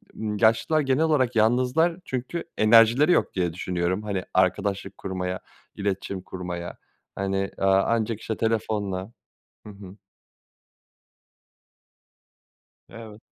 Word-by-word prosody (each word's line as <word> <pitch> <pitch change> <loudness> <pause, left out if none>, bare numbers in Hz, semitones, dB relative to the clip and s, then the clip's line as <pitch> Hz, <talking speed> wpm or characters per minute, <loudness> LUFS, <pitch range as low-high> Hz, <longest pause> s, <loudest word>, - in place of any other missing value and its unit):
yaşlılar 110 +8 +2
genel 135 +3 +1
olarak 130 -6 +1
yalnızlar 125 +9 +2
çünkü 130 +7 -4
enerjileri 115 +8 +5
yok - - +2
diye 90 -3 -1
düşünüyorum, 90 +2 -2
hani, 100 -3 -3
arkadaşlık 95 +1 0
kurmaya, 90 -1 -4 0.4
iletişim 100 -1 -3
kurmaya. 90 -2 -6 0.4
Hani, 95 0 -2
eee, 95 - -2
ancak 110 +3 +2
işte 110 - -4
telefonla. 105 -3 -2 0.6
Hı 105 - -9
hı. 100 -1 -12 2.9
Evet. 110 -1 -11
105 Hz, 100 wpm, -25 LUFS, 95-115 Hz, 2.9 s, enerjileri